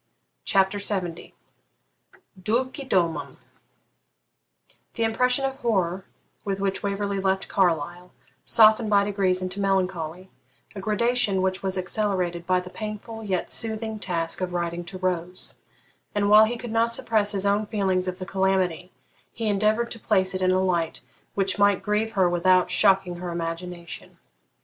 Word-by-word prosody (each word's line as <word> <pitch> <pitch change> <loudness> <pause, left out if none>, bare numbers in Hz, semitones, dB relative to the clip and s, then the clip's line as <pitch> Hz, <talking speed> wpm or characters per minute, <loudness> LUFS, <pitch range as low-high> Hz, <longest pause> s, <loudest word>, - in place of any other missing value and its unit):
CHAPTER 195 0 +3
LXX 185 -4 -2 1.1
DULCE 260 - -1
DOMUM 160 - 0 1.6
The 230 - 0
impression 250 +4 +2
of 270 0 -3
horror 190 -7 0 0.4
with 195 -1 -2
which 195 0 -1
Waverley 200 0 -2
left 190 0 0
Carlisle 175 -1 0 0.3
softened 220 0 +5
by 200 -1 +4
degrees 195 -2 0
into 185 +2 -3
melancholy, 185 -2 -1 0.4
a 195 - -5
gradation 215 -2 +1
which 190 0 0
was 190 -1 -2
accelerated 180 -3 -1
by 185 0 +3
the 180 0 -9
painful 215 +2 -6
yet 190 -4 -2
soothing 220 -1 -2
task 170 -3 -2
of 180 -1 -2
writing 170 0 -2
to 185 +2 -8
Rose; 180 -1 -3 0.6
and, 205 0 +2
while 215 +1 +9
he 235 +2 -3
could 240 -1 -6
not 230 +1 +2
suppress 215 -3 +1
his 195 0 0
own 205 +1 +1
feelings 190 -4 0
of 180 0 -3
the 185 - -6
calamity, 190 -2 0 0.4
he 225 -1 -4
endeavoured 215 +3 +1
to 230 - -6
place 190 -4 +1
it 185 - -3
in 185 - +3
a 185 0 +3
light 170 -3 -1 0.3
which 195 0 0
might 205 -1 +3
grieve 215 +1 0
her 190 -3 +3
without 180 +1 +3
shocking 190 -2 +3
her 180 0 -5
imagination. 170 +1 -6
195 Hz, 150 wpm, -25 LUFS, 180-215 Hz, 1.6 s, while